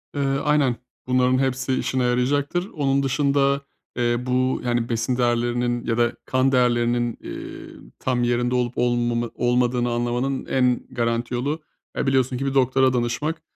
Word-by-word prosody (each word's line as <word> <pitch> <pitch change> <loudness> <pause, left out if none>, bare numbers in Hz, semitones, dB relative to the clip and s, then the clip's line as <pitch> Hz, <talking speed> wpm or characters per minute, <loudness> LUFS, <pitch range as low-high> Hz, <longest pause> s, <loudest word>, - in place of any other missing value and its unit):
Eee, 145 - -1 0.2
aynen, 150 -4 +2 0.3
bunların 130 0 +3
hepsi 130 0 0
işine 130 0 0
yarayacaktır. 140 +9 0
Onun 140 -2 +1
dışında, 140 +1 +2 0.4
eee 120 0 +1
bu, 130 +1 +1
yani, 120 -1 0
besin 120 +2 -1
değerlerinin 120 0 0
ya 115 0 0
da 120 0 +2
kan 130 +1 +2
değerlerinin, 120 -2 +1
eee, - - -9
tam 125 -2 0
yerinde 120 +1 +1
olup 125 -1 0
olmamı 120 -1 0
olmadığını 120 0 +1
anlamanın 120 +3 -1
en 125 -2 +1
garanti 115 0 -1
yolu, 145 +6 -2 0.4
e, - - -1
biliyorsun 130 -1 +2
ki 135 - -3
bir 135 - -1
doktora 130 0 +3
danışmak. 125 +7 -1
125 Hz, 145 wpm, -23 LUFS, 120-135 Hz, 0.4 s, bunların